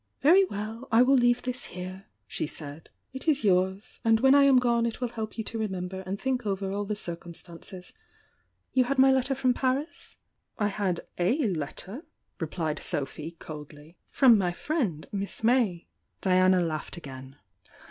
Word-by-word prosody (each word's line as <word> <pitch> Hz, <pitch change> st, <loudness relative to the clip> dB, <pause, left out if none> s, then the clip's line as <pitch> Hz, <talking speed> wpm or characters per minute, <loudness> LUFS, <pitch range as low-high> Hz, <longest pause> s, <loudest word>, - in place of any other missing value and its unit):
"Very 355 Hz, +7 st, +7 dB
well, 220 Hz, -, -6 dB
I 225 Hz, +2 st, +6 dB
will 265 Hz, +2 st, +4 dB
leave 245 Hz, -1 st, +3 dB
this 250 Hz, +1 st, -4 dB
here," 185 Hz, +2 st, -8 dB, 0.2 s
she -, -, -3 dB
said. 150 Hz, +1 st, -9 dB, 0.2 s
"It 265 Hz, +4 st, -6 dB
is 295 Hz, -4 st, +2 dB
yours, 190 Hz, +1 st, +1 dB
— -, -, -44 dB
and 225 Hz, -1 st, +4 dB
when 265 Hz, +3 st, +5 dB
I 280 Hz, 0 st, +7 dB
am 275 Hz, -2 st, +6 dB
gone 235 Hz, -2 st, +2 dB
it 230 Hz, -, -5 dB
will 250 Hz, -1 st, -1 dB
help 220 Hz, -1 st, -6 dB
you 220 Hz, -, -2 dB
to 225 Hz, +1 st, -5 dB
remember 190 Hz, -3 st, -3 dB
and 195 Hz, +2 st, -3 dB
think 255 Hz, -2 st, -1 dB
over 195 Hz, -2 st, -2 dB
all 205 Hz, +1 st, -2 dB
the 210 Hz, +1 st, -2 dB
circumstances. 175 Hz, 0 st, -9 dB, 0.8 s
You 255 Hz, -1 st, +4 dB
had 275 Hz, +2 st, -1 dB
my 265 Hz, 0 st, +6 dB
letter 265 Hz, +1 st, +2 dB
from 255 Hz, -1 st, +2 dB
Paris?" 265 Hz, +5 st, -2 dB, 0.4 s
"I 210 Hz, -2 st, +1 dB
had 195 Hz, -4 st, -1 dB, 0.2 s
o 175 Hz, -, +2 dB
letter," 205 Hz, -, -2 dB, 0.4 s
replied 160 Hz, -2 st, -2 dB
Sophy, 150 Hz, +3 st, -2 dB
coldly, 150 Hz, +1 st, -10 dB
"from 245 Hz, -6 st, +6 dB
my 180 Hz, -2 st, 0 dB
friend. 210 Hz, -, -2 dB
Miss 200 Hz, +2 st, -5 dB
May." 225 Hz, -8 st, +2 dB, 0.4 s
Diana 185 Hz, -1 st, +4 dB
laughed 160 Hz, 0 st, -3 dB
again. 135 Hz, -4 st, -9 dB
205 Hz, 170 wpm, -28 LUFS, 175-250 Hz, 0.8 s, Very